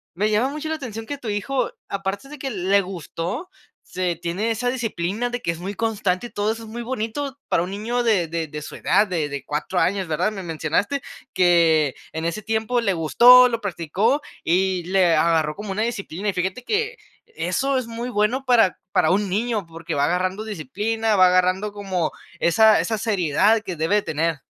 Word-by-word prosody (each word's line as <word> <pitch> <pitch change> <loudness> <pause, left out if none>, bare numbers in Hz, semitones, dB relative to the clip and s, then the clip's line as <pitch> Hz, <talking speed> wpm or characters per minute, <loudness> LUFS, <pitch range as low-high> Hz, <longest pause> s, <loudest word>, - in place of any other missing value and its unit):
me 210 +4 +1
llama 230 +6 +2
mucho 305 +2 -5
la 320 - 0
atención 225 -7 -6
que 285 +4 -5
tu 245 - -8
hijo, 230 +5 -1 0.2
aparte 195 +5 -3
de 300 -1 -10
que 270 0 -3
le 200 -1 +2
gustó, 185 - -5 0.4
se 180 -1 -1
tiene 175 +7 -2
esa 245 +2 0
disciplina 225 -2 -2
de 245 0 -4
que 170 - 0
es 165 - -7
muy 195 +3 -5
constante 215 -2 -1
y - - -16
todo 210 0 0
eso 225 0 -9
es 220 - -10
muy 235 +2 -6
bonito 260 +3 -4
para 165 - +2
un 180 - -3
niño 225 +5 -2
de 215 -8 +2
de 165 0 -3
de 150 +1 -7
su - - -8
edad, 210 - +3
de 165 -5 -1
de 140 -1 -5
4 150 +5 -3
años, 190 0 +1
¿verdad? 170 +6 0
Me 200 -2 -6
mencionaste 170 - -1 0.3
que, 165 -5 +4 0.2
en 160 0 -4
ese 170 +5 -2
tiempo 220 +3 0
le 200 -4 +1
gustó, 245 +10 +7
lo 230 -1 -2
practicó 200 - 0 0.2
y 185 +1 +1
le 180 -3 +3
agarró 160 -1 +2
como 205 -1 -6
una 210 - -2
disciplina, 205 -4 -3
y 195 - -1
fíjate 190 +7 -2
que, 445 - -1 0.3
eso 275 - -1
es 255 - -2
muy 235 +2 -5
bueno 225 +4 +1
para 230 -7 +4
para - - +3
un 200 +1 +1
niño, 215 +1 -1
porque 165 0 -6
va 140 - +2
agarrando 185 +5 -1
disciplina, 215 - -1
va 185 -1 +7
agarrando 185 +3 +2
como 190 -5 -2 0.3
esa 215 +5 +5
esa 220 -1 -1
seriedad 205 0 +2
que 185 -4 -5
debe 160 +6 +1
de 210 - +3
tener. 160 -3 -1
200 Hz, 200 wpm, -22 LUFS, 175-230 Hz, 0.4 s, gustó